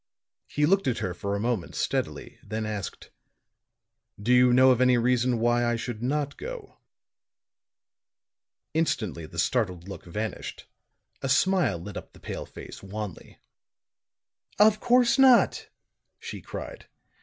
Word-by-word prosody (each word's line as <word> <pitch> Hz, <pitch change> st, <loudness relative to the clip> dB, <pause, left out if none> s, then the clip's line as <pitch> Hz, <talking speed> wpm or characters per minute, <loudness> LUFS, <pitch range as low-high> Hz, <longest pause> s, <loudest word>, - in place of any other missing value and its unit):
He 150 Hz, -, +1 dB
looked 195 Hz, +2 st, +2 dB
at 125 Hz, -, +1 dB
her 95 Hz, -, -2 dB
for 100 Hz, +2 st, -3 dB
a -, -, -2 dB
moment 115 Hz, -5 st, -2 dB
steadily, -, -, -3 dB
then 110 Hz, +1 st, -4 dB
asked: 105 Hz, -3 st, -6 dB, 1.1 s
"Do 115 Hz, +5 st, +2 dB
you 125 Hz, 0 st, +6 dB
know 130 Hz, +1 st, +6 dB
of 125 Hz, -1 st, +2 dB
any 125 Hz, -1 st, +5 dB
reason 125 Hz, 0 st, +2 dB
why 120 Hz, +1 st, +2 dB
I 120 Hz, 0 st, +1 dB
should 115 Hz, -1 st, -5 dB
not 145 Hz, +3 st, -1 dB
go?" 485 Hz, -2 st, -8 dB, 1.9 s
Instantly 110 Hz, -, -1 dB
the 85 Hz, -, -12 dB
startled 90 Hz, -2 st, 0 dB
look 100 Hz, -, -8 dB
vanished; 105 Hz, +5 st, -5 dB, 0.6 s
a 135 Hz, -, -2 dB
smile 180 Hz, -, +3 dB
lit 100 Hz, +5 st, -8 dB
up -, -, -9 dB
the -, -, -16 dB
pale -, -, -6 dB
face, -, -, -10 dB
wanly. 100 Hz, -1 st, -7 dB, 1.2 s
"Of 215 Hz, +1 st, +5 dB
course 245 Hz, +1 st, +3 dB
not," 260 Hz, -3 st, +5 dB, 0.5 s
she -, -, -8 dB
cried. -, -, -8 dB
120 Hz, 135 wpm, -27 LUFS, 105-145 Hz, 1.9 s, you